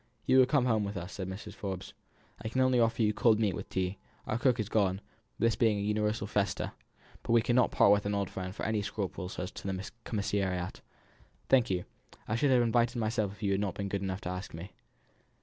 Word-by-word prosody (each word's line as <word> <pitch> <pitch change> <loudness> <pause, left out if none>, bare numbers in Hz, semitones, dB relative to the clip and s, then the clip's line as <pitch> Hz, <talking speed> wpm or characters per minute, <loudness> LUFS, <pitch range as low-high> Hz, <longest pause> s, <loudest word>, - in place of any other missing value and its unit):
"You 130 - +5
will 130 - +6
come 135 -2 +3
home 110 -4 +2
with 100 0 -4
us," 90 +1 -6
said 95 -1 -4
Mrs. 95 +2 -7
Forbes. 95 -1 -5 0.5
"I 110 - -3
can 130 - -2
only 130 -1 +4
offer 115 0 +2
you 105 0 +3
cold 110 0 +4
meat 105 -4 +2
with - - -6
tea; 95 +1 -2 0.3
our 110 - -1
cook 125 -1 +3
is 105 - -1
gone 100 -4 +2
out, 100 - -15 0.3
this 115 -1 +2
being 110 -2 +3
a - - -2
universal 105 0 0
festa; 100 -1 -1 0.5
but - - -1
we 115 - +6
cannot 125 +1 +3
part 100 - +5
with 100 0 +3
an 100 - 0
old 100 -1 0
friend 95 0 -5
for - - -4
any 110 -1 +1
scruples 95 -2 -4
as 90 +1 -4
to - - -8
the 95 +1 -4
commissariat." 95 -4 -2 0.7
"Thank 125 -3 +5
you. 90 -2 -1 0.4
I 105 - 0
should 140 +5 +2
have 125 -2 +5
invited 120 +1 +2
myself 110 -3 0
if 105 - -13
you 100 - +1
had 100 +1 +1
not 100 -3 -2
been 100 -1 -3
good 100 0 -2
enough 95 0 -3
to - - -4
ask 90 -1 -5
me." 90 +5 -8
105 Hz, 235 wpm, -31 LUFS, 95-115 Hz, 0.7 s, will